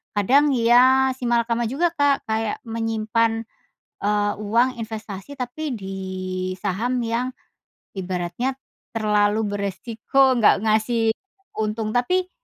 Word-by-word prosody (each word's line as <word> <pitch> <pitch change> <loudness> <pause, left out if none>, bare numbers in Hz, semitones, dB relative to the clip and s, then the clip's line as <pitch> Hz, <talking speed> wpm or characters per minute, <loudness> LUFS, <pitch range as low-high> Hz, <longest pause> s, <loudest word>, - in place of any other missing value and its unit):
kadang 275 +7 +4
ya 255 +3 +5
simalakama 235 -2 0
juga, 320 +9 +1
Kak. 285 -2 +2
Kayak 220 0 -1
menyimpan, 225 0 0 0.6
eee, 205 0 +1
uang 235 +4 +1
investasi 215 +2 -7
tapi 260 +5 -4
di 195 -3 -6 0.6
saham 215 +7 -1
yang 235 +2 -1 0.7
ibaratnya 185 +7 -2 0.4
terlalu 210 -1 +2
beresiko, 225 +6 +1
nggak 215 -3 +4
ngasih 225 +1 +2 0.5
untung, 215 0 -1
tapi 365 +10 +1
225 Hz, 100 wpm, -23 LUFS, 210-250 Hz, 0.7 s, ya